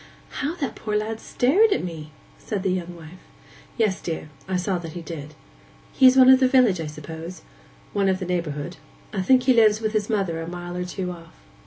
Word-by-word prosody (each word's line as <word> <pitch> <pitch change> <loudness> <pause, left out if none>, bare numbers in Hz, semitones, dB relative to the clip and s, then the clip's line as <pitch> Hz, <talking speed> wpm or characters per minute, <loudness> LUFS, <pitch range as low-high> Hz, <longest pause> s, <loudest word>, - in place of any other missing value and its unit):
'How 295 +4 -2
that 285 -6 -3
poor 210 -1 -2
lad 220 +1 -3
stared 370 - +3
at - - +1
me!' 160 -3 -7 0.3
said 205 -4 -4
the 190 - +1
young 175 -1 -3
wife. 170 +2 -12 0.6
'Yes, 215 -5 +1
dear; 160 -2 -5 0.2
I 190 - -1
saw 180 0 -1
that 165 -2 -8
he 175 - -7
did.' 155 -3 -8 0.6
'He 260 - +6
is 255 +1 +6
one 260 0 +8
of 260 - +7
the 260 - +4
village, 250 -9 +4
I 160 - -4
suppose?' 160 +4 -8 0.5
'One 200 -1 +2
of 190 - +1
the 185 - -5
neighbourhood. 170 -2 -3 0.4
I 195 - -1
think 255 +7 +4
he 255 0 +5
lives 215 -2 +5
with 220 -1 -2
his 210 -1 0
mother 190 -7 -1
a 165 - -6
mile 175 0 -6
or 180 0 -3
two 180 0 -4
off. 165 -2 -12
185 Hz, 215 wpm, -24 LUFS, 170-225 Hz, 0.6 s, one